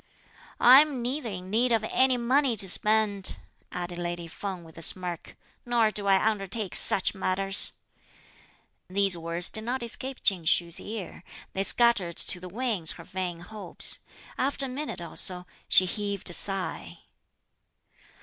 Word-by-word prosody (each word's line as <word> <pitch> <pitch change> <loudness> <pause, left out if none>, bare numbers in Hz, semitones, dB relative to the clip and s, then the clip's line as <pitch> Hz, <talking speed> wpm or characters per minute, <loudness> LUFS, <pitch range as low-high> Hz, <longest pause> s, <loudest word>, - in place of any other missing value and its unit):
"I'm 265 0 +5
neither 255 0 -3
in 185 -1 -8
need 240 +3 +1
of 225 -2 +1
any 260 +3 +1
money 250 0 +1
to 195 -1 +1
spend," 210 0 +1 0.3
added 175 -1 -6
lady 175 0 -5
Feng 185 +1 -7
with 160 -1 -17
a - - -11
smirk, 175 0 -2 0.3
"nor 235 -3 +1
do 205 -1 -3
I 195 +2 +3
undertake 205 -2 -3
such 190 - +4
matters!" 195 0 -1 1.2
These 195 0 +2
words 170 +1 -1
did 220 - -3
not 245 +2 -3
escape 260 +3 -1
Ching 180 -5 +1
Hsü's 170 +1 +3
ear; 205 -5 -8 0.3
they 195 - -2
scattered 205 -6 +2
to 180 - +5
the 180 0 -10
winds 210 -6 +1
her 165 - -12
vain 180 -1 -6
hopes. 210 +3 -2 0.4
After 275 +1 -1
a - - -6
minute 270 -7 -5
or 170 - -10
so 180 -1 +4 0.2
she 185 - +9
heaved 200 0 -4
a - - -7
sigh. 195 +1 -5
195 Hz, 150 wpm, -26 LUFS, 180-235 Hz, 1.2 s, she